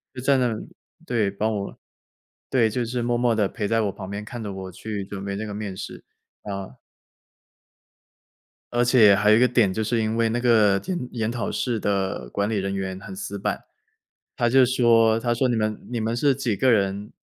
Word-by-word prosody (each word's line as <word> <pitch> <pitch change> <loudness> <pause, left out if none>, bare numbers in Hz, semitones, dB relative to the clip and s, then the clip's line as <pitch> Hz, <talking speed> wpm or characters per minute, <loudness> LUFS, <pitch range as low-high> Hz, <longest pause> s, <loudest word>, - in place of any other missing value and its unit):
就 - - -6
在 135 +1 +3
那 120 -3 +1 0.5
对， 110 -5 +1
帮 105 +2 -1
我， 100 -1 -5 0.7
对， 120 -4 +3
就 120 +3 -2
是 120 +1 -3
默 120 0 0
默 120 -1 +2
地 105 -3 +2
陪 105 -1 -4
在 115 +1 +2
我 100 -2 0
旁 95 -1 -9
边 100 +1 -5
看 120 +1 -7
着 100 - -4
我 95 -1 -7
去 100 +1 -5
准 100 0 -7
备 100 0 -3
那 110 +2 -4
个 105 - -6
面 100 -2 -5
试， - - -8 0.4
呃。 100 -8 -6 2.0
而 120 0 +2
且 115 -5 +6
还 105 +2 +3
有 110 - +7
一 - - +5
个 125 - +6
点， 120 -7 +2
就 110 +2 -2
是 115 +1 0
因 110 +1 -1
为 115 -1 +2
那 120 +2 -1
个 110 -5 +4
点， 185 -1 -3
研 110 -2 -1
讨 120 -1 -3
室 120 -3 -1
的 95 -11 -2
管 100 +1 -1
理 110 - -1
人 95 0 -2
员 95 -1 -3
很 190 - -9
死 190 - -5
板， - - -2 0.7
他 120 - +1
就 130 0 +6
说， 115 -3 +4
他 120 0 0
说 130 +2 +1
你 120 - +1
们 110 -1 -2
你 120 -2 -2
们 115 +2 -1
是 140 +1 +2
几 125 -6 -1
个 130 -1 +3
人 100 -1 0
110 Hz, 230 characters per minute, -24 LUFS, 100-120 Hz, 2.0 s, 有